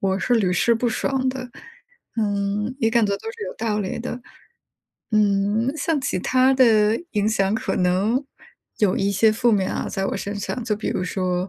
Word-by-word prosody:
我 190 0 0
是 245 - +1
屡 195 -6 +2
试 230 +6 +3
不 240 +2 0
爽 260 +3 -1
的， 255 -1 -4 0.7
嗯， 205 +1 -1
也 225 - +2
感 230 -1 +3
觉 200 - -1
都 450 - -7
是 450 -2 -7
有 - - -6
道 220 -2 -1
理 190 -3 -3
的。 245 +1 -5 0.9
嗯， 210 +3 +2
像 310 0 0
其 255 - -1
它 255 +7 +3
的 225 -4 +4
影 210 -1 +1
响 200 -2 +1
可 255 +3 -2
能 195 +9 +1 0.5
有 205 -4 +2
一 200 +1 0
些 215 +3 +4
负 235 +1 +2
面 195 -3 +1
啊， - - -3
在 195 - -2
我 - - -2
身 200 - -4
上。 225 +5 -4
就 220 -2 0
比 215 - -4
如 180 - -1
说 180 0 -2
215 Hz, 210 characters per minute, -22 LUFS, 200-245 Hz, 0.9 s, 的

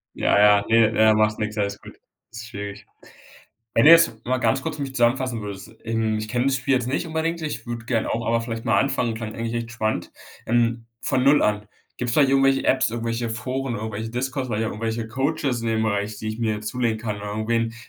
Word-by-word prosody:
Ja, - - +2
ja, 105 -1 +5
ne 115 -1 +4
ja 110 0 +5
machst 110 0 +2
nix, 105 0 -3
alles 100 -1 -1
gut. - - -13 0.3
Ist 115 0 -8
schwierig. 100 -3 -7 0.9
Wenn 115 - +4
du - - +10
jetzt 165 -5 +7
mal 130 +1 0
ganz 130 +1 +1
kurz - - -4
für 145 - -4
mich 135 -1 -5
zusammenfassen 120 -1 +1
würdest. 100 +1 -8
Ähm, 110 -1 0
ich 110 0 -5
kenne 125 +2 0
das 135 -1 +2
Spiel 135 +1 +1
jetzt 125 -1 0
nicht 140 +6 -1
unbedingt. 165 +1 -2
Ich 115 -7 -5
würde 120 -1 -5
gern 115 -3 0
auch, 115 - -2
aber 115 0 +2
vielleicht 115 -1 -5
mal 110 -4 +3
anfangen. 125 -2 0
Klang 110 -1 -6
eigentlich 115 0 -4
echt 115 0 -4
spannend. 110 -2 -2 0.3
Ähm, 115 0 +1
von 130 0 0
0 145 +2 +5
an 105 0 0 0.3
gibt's 120 -2 -2
vielleicht 140 -3 +4
irgendwelche 135 0 +3
Apps, 130 -3 +2
irgendwelche 115 0 -3
Foren, 125 +3 -3
irgendwelche 110 +1 -5
Discos, 130 +2 -2
vielleicht 110 0 -1
auch 110 - -2
irgendwelche 115 +1 -3
Coaches 135 0 -1
in 115 - -1
dem 110 0 +1
Bereich, 105 -1 -1
die 110 - -5
ich 110 +1 -5
mir 110 -2 -1
zulegen 115 0 -1
kann 105 -2 -4
oder 105 0 -7
irgendwen, 115 +2 0
w - - -14
115 Hz, 225 wpm, -23 LUFS, 110-130 Hz, 0.9 s, du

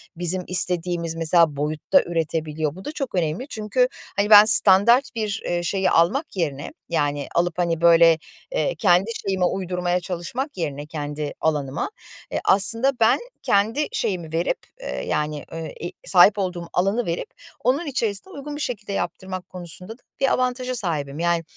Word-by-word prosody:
Bizim 175 +2 -1
istediğimiz, 175 -2 -1
mesela, 165 -1 +3
boyutta 155 - +1
üretebiliyor. 160 -2 -2
Bu 190 - -11
da - - -4
çok 275 -8 -5
önemli. 175 - -1
Çünkü, 235 +2 0 0.3
hani, 205 +1 +1
ben 210 -1 +10
standart 225 +4 +7
bir, 215 -1 -2
eee, 175 0 -1
şeyi 190 +1 0
almak 210 - +1
yerine, 145 -6 -3 0.2
yani, 145 -3 -1
alıp, 175 0 +1
hani, 170 -2 0
böyle, 165 -1 +6 0.3
eee, - - -1
kendi 180 +5 +3 0.2
şeyime 190 -2 +1
uydurmaya 180 -1 -1
çalışmak 190 - -5
yerine 145 -4 -4
kendi 150 -1 -5
alanıma, 145 -3 -1 0.4
eee, - - -1
aslında 230 +7 +3
ben 225 0 +4 0.2
kendi 225 +9 +1
şeyimi 175 -8 -3
verip, 170 +2 0 0.2
eee, - - -5
yani, 150 -1 -2
eee, 165 -1 -6
i - - -8 0.2
sahip 195 +3 +6
olduğum 180 -3 -3
alanı 200 +6 +1
verip 170 - -3 0.3
onun 280 +7 +1
içerisine 235 - -2
uygun 290 +1 -7
bir 295 - -6
şekilde 210 -6 -4
yaptırmak 185 0 -5
konusunda 180 +3 -8
da - - -29 0.2
bir 270 - +2
avantaja 255 0 -1
sahibim, 155 - -3
yani, 170 0 +1
180 Hz, 155 wpm, -22 LUFS, 165-220 Hz, 0.4 s, ben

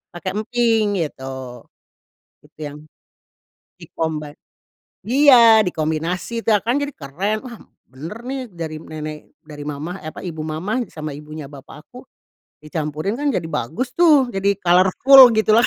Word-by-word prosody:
pakai 185 +2 -4
emping, 220 -1 +1
gitu. 130 -4 -8 0.8
Gitu - - -25
yang 145 -1 -6 1.0
di-combine 155 -2 -5 0.7
iya 235 -3 +6
dikombinasi 170 +8 -2
itu - - -7
ya 205 - +1
kan 240 +6 0
jadi 285 -1 -4
keren, 190 +10 -3
"Wah, 240 -4 -10 0.3
benar 165 - -9
nih, 260 +1 -5
dari 160 -3 -6
nenek 155 -1 -9
dari 150 -2 -10
mamah," 155 +6 -5
eh - - -4
apa, - - -9
"ibu 160 -4 -6
mamah 195 +10 -3
sama 155 -1 -5
ibunya 150 0 -9
bapak 145 +1 -13
aku." 250 +1 -13 0.6
Dicampurin 155 - -3
kan 290 - -3
jadi - - -2
bagus 190 - -3
tuh, 295 -7 +5
jadi 200 0 0
colorful, 220 +8 +7
gitu 220 0 +3
loh. 240 - +4
180 Hz, 140 wpm, -20 LUFS, 155-230 Hz, 1.0 s, colorful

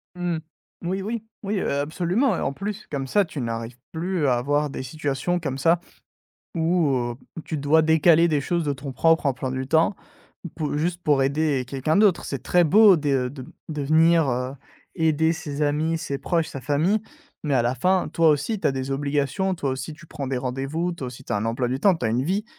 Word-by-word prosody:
Mmh, 175 -2 -1 0.5
oui, 185 +3 -2
oui. 220 +3 -4 0.2
Oui, 200 0 -1
heu, - - -1
absolument 175 - 0
et - - -3
en - - 0
plus 205 +8 -5
comme 135 -2 -3
ça 205 +9 +3
tu 160 -5 -7
n'arrives 115 0 -4 0.2
plus 170 -1 -1
à 125 - +3
avoir 145 +4 0
des 135 - -5
situations 145 +5 -2
comme 140 -5 -3
ça, 165 +5 +3 0.8
où, 165 -2 +2
heu, 120 -2 -1 0.2
où - - -4
tu 160 - -4
dois 150 +3 +3
décaler 160 +1 +5
des 150 -3 +1
choses 170 +4 -1
de 145 - 0
ton 135 0 -7
propre 165 +3 +3
emploi 130 -1 -1
du 130 0 -3
temps 160 +7 +2 0.5
ou - - -4
pou 150 -2 -3
juste 170 +3 -2
pour 145 -5 +3
aider 140 -1 +1
quelqu'un 135 +4 -1
d'autre. 200 -4 +4
C'est 135 -3 -5
très 180 - +3
beau 200 +3 +7
des, 145 -2 0
heu, 125 -2 +1
de 135 -1 -9
b 130 - -12 0.2
de 150 -2 -3
venir, 160 +1 +4
heu, 125 +1 -2 0.4
aider 160 -1 +2
ses 150 -4 -4
amis, 155 +3 +1
ses 140 -3 -4
proches, 165 0 0
sa 135 - -7
famille, 155 - +1 0.4
mais 145 -3 0
à 125 - +3
la 120 +2 0
fin, 185 +8 +1
toi 165 -1 +3
aussi, 155 +8 +1
tu - - +1
as - - 0
des 135 0 -4
obligations, 145 +7 0
toi 140 -5 -2
aussi 130 +4 -4
tu 170 +2 -16
prends 145 -3 -6
des 130 -1 -1
rendez-vous, 135 +7 -2
toi 140 -7 -6
aussi 130 +2 -11
tu - - -5
as - - +1
un 105 - -1
emploi 115 +2 -1
du 130 +2 -2
temps, 195 +1 +5
tu 145 - -6
as - - +1
une 120 +3 +1
vie, 195 +6 -1
150 Hz, 230 wpm, -24 LUFS, 135-170 Hz, 0.8 s, beau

